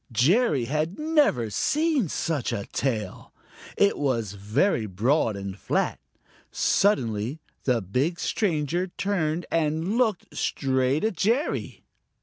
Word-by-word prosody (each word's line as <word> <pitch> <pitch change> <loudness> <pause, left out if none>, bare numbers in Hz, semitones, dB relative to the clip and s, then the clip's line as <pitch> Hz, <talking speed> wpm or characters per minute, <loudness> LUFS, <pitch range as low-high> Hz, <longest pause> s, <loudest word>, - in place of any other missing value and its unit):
Jerry 140 - +3
had 155 +7 -2
never 295 - +2
seen 295 - +1
such 150 -5 -1
a 100 - -3
tail. 115 -5 -2 0.5
It 200 - +3
was 120 -8 0
very 105 - 0
broad 110 - +1
and 100 -1 -5
flat. - - -1 0.5
Suddenly 125 - +1 0.3
the 120 -5 +1
big 135 - -1
stranger 175 -2 0
turned 175 -4 -1
and 165 +6 0
looked 220 -7 0
straight 130 +2 0
at 220 -3 0
Jerry. 235 - -1
150 Hz, 115 wpm, -26 LUFS, -, 0.5 s, Jerry